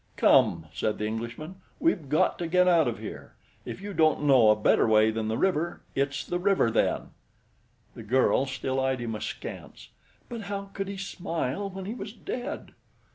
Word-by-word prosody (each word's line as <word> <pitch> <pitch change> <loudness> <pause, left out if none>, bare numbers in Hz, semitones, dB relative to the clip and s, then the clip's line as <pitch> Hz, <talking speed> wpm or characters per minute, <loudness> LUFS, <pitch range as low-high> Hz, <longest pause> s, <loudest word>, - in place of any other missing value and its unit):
"Come!" 80 -1 +4
said 105 +6 -1
the 105 - -2
Englishman. 115 - -5 0.2
"We've 180 - +1
got 150 - +2
to 170 - -2
get 180 +2 +3
out 170 -5 +4
of 120 - -2
here. - - -9 0.3
If - - -7
you 205 0 -6
don't 155 -3 +3
know 130 -6 +6
a 105 - +6
better 105 - +3
way 110 0 +5
than 110 0 -3
the 110 +1 -1
river, 175 -3 0
it's 140 0 -1
the 175 - -2
river 190 -11 +2
then." - - 0 0.8
The - - -10
girl 130 +4 +2
still 130 0 -2
eyed 130 -1 0
him 115 -2 -3
askance. 105 - -7 0.4
"But 235 -2 -6
how 200 -1 -5
could 195 -1 -3
he 200 0 -5
smile 190 -3 -3
when 190 0 -7
he 210 - -4
was 210 -3 -7
dead?" 250 +4 -6
155 Hz, 185 wpm, -27 LUFS, 115-195 Hz, 0.8 s, know